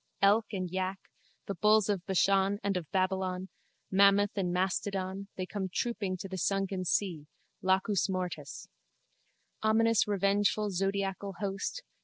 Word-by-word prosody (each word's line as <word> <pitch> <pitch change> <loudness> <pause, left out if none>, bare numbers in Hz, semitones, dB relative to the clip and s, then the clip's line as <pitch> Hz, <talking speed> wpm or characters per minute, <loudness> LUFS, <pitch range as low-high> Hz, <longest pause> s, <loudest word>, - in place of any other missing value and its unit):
Elk 210 +3 +5
and 185 -3 -2
yak, 190 +1 -2 0.5
the 200 - -3
bulls 210 +2 +4
of 200 -4 -1
Bashan 195 +1 +3
and 200 -1 0
of 175 -5 -3
Babylon, 185 0 -1 0.4
mammoth 200 +1 +5
and 185 -3 0
mastodon, 190 +1 -1
they 185 - -3
come 190 0 -4
trooping 205 -4 -2
to 190 - -6
the 190 -1 -5
sunken 195 0 -1
sea, 175 -5 0 0.3
Lacus 190 +2 +2
Mortis. 180 -6 -4 0.9
Ominous 225 0 +3
revengeful 205 +1 +1
zodiacal 195 +1 -1
host! 200 - -3
195 Hz, 130 wpm, -31 LUFS, 185-205 Hz, 0.9 s, Elk